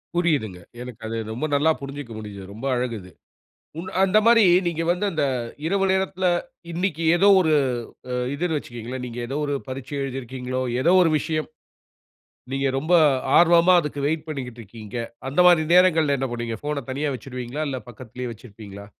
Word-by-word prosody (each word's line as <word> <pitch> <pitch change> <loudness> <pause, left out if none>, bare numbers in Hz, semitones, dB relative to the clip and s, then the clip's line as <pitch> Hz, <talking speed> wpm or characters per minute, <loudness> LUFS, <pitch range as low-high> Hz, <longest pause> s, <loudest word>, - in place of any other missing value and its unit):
புரியுதுங்க. 145 - 0 0.2
எனக்கு 125 -2 -9
அது 115 +1 -3 0.2
ரொம்ப 125 +7 -3
நல்லா 155 +3 +3
புரிஞ்சுக்க 140 -3 -7
முடியுது. 105 -2 -8
ரொம்ப 115 +6 -8
அழகு 120 -2 -2
அது. 90 0 -14 0.7
உன் 185 +3 -6
அந்த 195 +2 +3
மாரி 230 -1 +7 0.2
நீங்க 165 -1 -1
வந்து 180 +4 -1
அந்த 155 -3 0 0.4
இரவு 195 +3 +1
நேரத்துல, 190 0 -1 0.5
இன்னைக்கு 170 -1 -2
ஏதோ 190 +3 +4
ஒரு 160 -3 +2 0.6
அ - - -2 0.2
இதுன்னு 160 0 -1
வச்சுக்கங்களேன். 120 0 -7
நீங்க 120 0 -8
ஏதோ 135 - -3
ஒரு 145 - -1
பரீட்ச 130 +1 -7
எழுதி 135 -1 -4
இருக்கீங்களோ? 130 +1 -4 0.2
ஏதோ 170 - +4
ஒரு 165 -3 +3
விஷயம். 155 +1 -2 1.0
நீங்க 135 0 0
ரொம்ப 155 +6 -2 0.4
ஆர்வமா 170 +1 +6
அதுக்கு 150 -3 -5
வெயிட் 155 +1 -1
பண்ணிக்கிட்ருக்கீங்க. 115 -6 -7 0.3
அந்த 140 +6 +1
மாரி 170 -3 +6
நேரங்கள்ல 160 -6 +4
என்ன 135 0 -2
பண்ணுவீங்க? 120 -2 -4
ஃபோன 145 -3 -3
தனியா 140 +2 -1
வச்சுருவீங்களா? 125 +3 -6
இல்ல 130 - -3
பக்கத்துலேயே 120 +1 -7
வச்சுருப்பீங்களா? 100 -3 -11
140 Hz, 160 wpm, -23 LUFS, 120-165 Hz, 1.0 s, மாரி